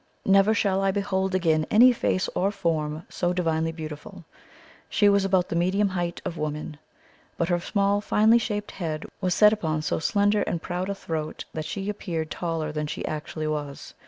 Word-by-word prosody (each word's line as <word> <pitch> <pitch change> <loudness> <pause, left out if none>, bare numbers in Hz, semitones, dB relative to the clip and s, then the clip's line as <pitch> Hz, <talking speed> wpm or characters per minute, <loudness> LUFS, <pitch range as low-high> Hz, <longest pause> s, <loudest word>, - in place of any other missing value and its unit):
Never 195 +3 +5
shall 195 -2 +1
I 195 - +2
behold 190 -1 -1
again 160 -4 +2
any 245 +4 +7
face 185 -5 0
or 195 - +1
form 160 -5 -2
so 175 0 -1
divinely 165 -2 0
beautiful! 155 -2 -8 0.6
She 205 - +3
was 200 -1 +4
about 190 -2 +1
the - - -2
medium 190 +4 +2
height 175 -2 -3
of 165 - -4
women, 150 0 -4 0.6
but 170 - 0
her 175 -1 +2
small 200 +2 +1
finely 220 +3 +4
shaped 210 -2 -3
head 160 -4 -4 0.2
was 185 -2 +1
set 210 0 +6
upon 155 -7 -2
so - - -1
slender 205 +4 +2
and 170 - -1
proud 180 +3 -4
a 200 - -2
throat 160 -4 -5
that 155 -1 -4
she 195 +3 -4
appeared 170 -6 -3
taller 165 -3 -2
than 150 0 -3
she - - -4
actually 155 0 -4
was. 150 -2 -4
180 Hz, 185 wpm, -25 LUFS, 155-200 Hz, 0.6 s, any